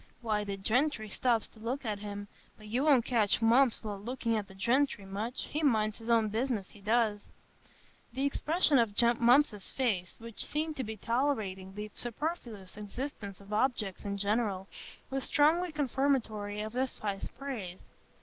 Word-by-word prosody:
Why, 215 Hz, -3 st, 0 dB
the 200 Hz, -1 st, -4 dB
gentry 225 Hz, +3 st, +1 dB
stops 235 Hz, +1 st, +1 dB
to 220 Hz, -, -18 dB
look 245 Hz, +5 st, -3 dB
at 210 Hz, -2 st, -2 dB
him; 205 Hz, 0 st, -6 dB, 0.3 s
but 215 Hz, -, -14 dB
you 235 Hz, +6 st, 0 dB
won't 275 Hz, -6 st, +5 dB
catch 225 Hz, -6 st, +2 dB
Mumps 235 Hz, +2 st, +4 dB
a 215 Hz, -, -4 dB
looking 230 Hz, +2 st, -2 dB
at 210 Hz, -2 st, -2 dB
the 190 Hz, -, -14 dB
gentry 235 Hz, +1 st, +1 dB
much,—he 225 Hz, +9 st, -3 dB
minds 220 Hz, -7 st, +2 dB
his 225 Hz, +1 st, -8 dB
own 225 Hz, -2 st, +4 dB
business, 225 Hz, -3 st, -1 dB
he 205 Hz, -, -16 dB
does." 215 Hz, -1 st, +1 dB, 0.8 s
The 265 Hz, +3 st, -1 dB
expression 300 Hz, 0 st, +3 dB
of 220 Hz, -4 st, +1 dB, 0.2 s
Mump's 240 Hz, -4 st, +4 dB
face, 205 Hz, -9 st, -1 dB
which 230 Hz, -1 st, -5 dB
seemed 310 Hz, +1 st, -2 dB
to 260 Hz, -, -1 dB
be 220 Hz, -1 st, -5 dB
tolerating 210 Hz, -6 st, -1 dB
the 210 Hz, 0 st, -5 dB
superfluous 235 Hz, -, -4 dB
existence 210 Hz, -1 st, -5 dB
of 200 Hz, +1 st, -9 dB
objects 215 Hz, -4 st, 0 dB
in 200 Hz, -1 st, -3 dB
general, 200 Hz, -2 st, 0 dB, 0.4 s
was 270 Hz, 0 st, 0 dB
strongly 330 Hz, +4 st, +3 dB
confirmatory 255 Hz, -8 st, 0 dB
of 215 Hz, +1 st, -5 dB
this 255 Hz, +1 st, -1 dB
high 200 Hz, -2 st, -2 dB, 0.2 s
praise. 230 Hz, -10 st, -5 dB
225 Hz, 160 wpm, -31 LUFS, 205-265 Hz, 0.8 s, won't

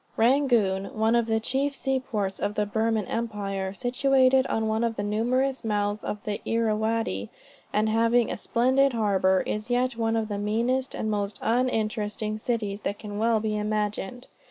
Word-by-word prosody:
Rangoon, 230 Hz, -6 st, +3 dB
one 220 Hz, +2 st, +3 dB
of 235 Hz, -1 st, +2 dB
the 220 Hz, -1 st, +1 dB
chief 275 Hz, +5 st, -1 dB
seaports 235 Hz, -9 st, -2 dB
of 205 Hz, -, -2 dB
the 210 Hz, -, +1 dB
Burman 220 Hz, 0 st, 0 dB
Empire, 200 Hz, -4 st, -3 dB
situated 260 Hz, +3 st, +3 dB
on 220 Hz, 0 st, 0 dB
one 220 Hz, +1 st, 0 dB
of 230 Hz, -1 st, 0 dB
the 205 Hz, -, -3 dB
numerous 250 Hz, +6 st, 0 dB
mouths 205 Hz, -1 st, -1 dB
of 210 Hz, -, -4 dB
the 210 Hz, -2 st, -3 dB
Irrawaddy, 220 Hz, -, 0 dB, 0.4 s
and 215 Hz, +1 st, +1 dB
having 230 Hz, +2 st, +2 dB
a -, -, -3 dB
splendid 260 Hz, +3 st, +2 dB
harbor, 195 Hz, -4 st, +2 dB
is 215 Hz, +3 st, -3 dB
yet 245 Hz, 0 st, +1 dB
one 225 Hz, -1 st, 0 dB
of 220 Hz, -1 st, 0 dB
the 205 Hz, -1 st, -3 dB
meanest, 235 Hz, +6 st, 0 dB
and 220 Hz, -, -2 dB
most 205 Hz, -1 st, -2 dB
uninteresting 215 Hz, -3 st, 0 dB
cities 215 Hz, -3 st, -2 dB
that 200 Hz, -, -3 dB
can 205 Hz, -1 st, -6 dB
well 225 Hz, 0 st, +3 dB
be 215 Hz, 0 st, -2 dB
imagined. 210 Hz, +2 st, -2 dB
220 Hz, 165 wpm, -26 LUFS, 210-240 Hz, 0.4 s, Rangoon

